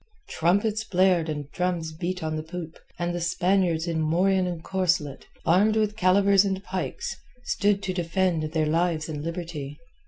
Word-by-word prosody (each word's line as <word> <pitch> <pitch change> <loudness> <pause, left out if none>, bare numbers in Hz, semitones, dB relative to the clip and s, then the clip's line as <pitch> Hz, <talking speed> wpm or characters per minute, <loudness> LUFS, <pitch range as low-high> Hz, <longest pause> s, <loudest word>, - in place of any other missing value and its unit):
Trumpets 205 +6 +1
blared 180 -5 +2
and 145 -2 -5
drums 175 -3 -1
beat 180 +2 -4
on 155 0 -2
the 155 - -2
poop, 165 0 -8 0.2
and 175 0 -2
the 175 - -3
Spaniards 175 -1 +1
in 165 -1 -1
morion 180 +4 +2
and 170 -2 -5
corselet, 175 -7 -1 0.2
armed 205 +6 +4
with 215 -1 +1
calivers 195 0 +4
and 190 -1 -2
pikes, 200 - -4 0.3
stood 200 -3 +1
to 185 - -2
defend 175 -1 0
their 160 -1 +1
lives 160 0 0
and 150 -2 -5
liberty. 165 -4 -5
175 Hz, 160 wpm, -26 LUFS, 160-190 Hz, 0.3 s, armed